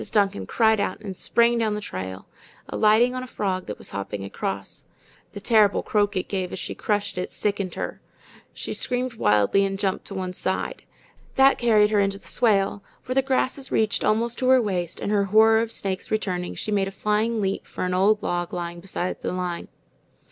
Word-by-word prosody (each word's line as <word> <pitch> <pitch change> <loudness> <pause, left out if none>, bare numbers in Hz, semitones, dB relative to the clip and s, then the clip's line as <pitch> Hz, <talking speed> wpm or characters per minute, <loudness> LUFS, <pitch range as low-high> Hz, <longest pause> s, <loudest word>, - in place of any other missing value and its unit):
Duncan 195 - +1
cried 220 -1 +3
out 200 -2 -1
and 195 -3 -6
sprang 235 +4 +2
down 215 -2 +1
the - - -2
trail, 95 - -6 0.4
alighting 220 +4 +3
on 255 - -3
a 255 - -7
frog 190 -6 -2
that 105 - -5
was - - -11
hopping 100 0 -4
across. 100 0 -5 0.5
The 205 - -8
horrible 215 -4 +4
croak 205 -2 +1
it 185 - -2
gave 190 -2 -2
as - - -5
she - - -4
crushed 205 -3 -1
it 180 - -3
sickened 200 -3 -2
her. - - -5 0.5
She - - -5
screamed 250 0 -2
wildly 105 - +3
and 195 0 -1
jumped 195 -1 -1
to 195 - -7
one 185 -1 -3
side. 190 - -3 0.5
That 270 +1 +5
carried 215 -3 +4
her 210 - +3
into 195 0 +1
the - - -19
swale, 205 -4 +2 0.2
where 255 - -2
the 270 - +4
grasses 265 0 -1
reached 215 -2 +1
almost 230 +2 +1
to 255 - +1
her 260 0 +7
waist, 180 -6 -2
and 205 - -2
her 200 -1 +2
horror 220 +2 +5
of 230 0 -3
snakes 190 -4 -3
returning, 185 -5 -2
she 215 - -4
made 200 -2 +1
a - - -2
flying 215 +3 0
leap 195 -1 -2
for - - -4
an 180 - -1
old 205 +3 +3
log 175 -1 -2
lying 170 -1 -4
beside 185 0 -4
the - - -2
line. 180 -1 -3
205 Hz, 200 wpm, -24 LUFS, 185-220 Hz, 0.5 s, her